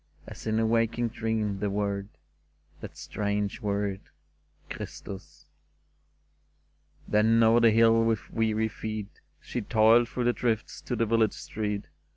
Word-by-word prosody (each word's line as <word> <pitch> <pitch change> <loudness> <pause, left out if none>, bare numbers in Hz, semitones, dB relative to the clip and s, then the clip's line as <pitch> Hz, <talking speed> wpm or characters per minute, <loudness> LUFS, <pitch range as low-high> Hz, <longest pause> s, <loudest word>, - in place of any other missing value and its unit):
As - - -9
in 110 0 +1
a 115 - +2
waking 115 +1 +1
dream, 110 -3 -2
the 105 - -1
word 100 0 -2 0.4
— 75 0 -37
That - - -9
strange 105 +1 -2
word, 100 -2 -1 0.3
" - - -37
Christus! 95 -1 -8 0.9
" - - -37
Then 110 +2 +4
over 115 +1 +5
the 115 -1 +6
hill 115 +1 +5
with 115 -2 -1
weary 110 -1 +1
feet 110 -2 -6 0.2
She 120 - -4
toiled 115 +3 +4
through 125 -1 -2
the 120 0 +3
drifts 115 -3 -2
to 125 - -2
the 115 - +1
village 110 -1 +2
street. 105 -2 -4
110 Hz, 150 wpm, -28 LUFS, 105-115 Hz, 0.9 s, the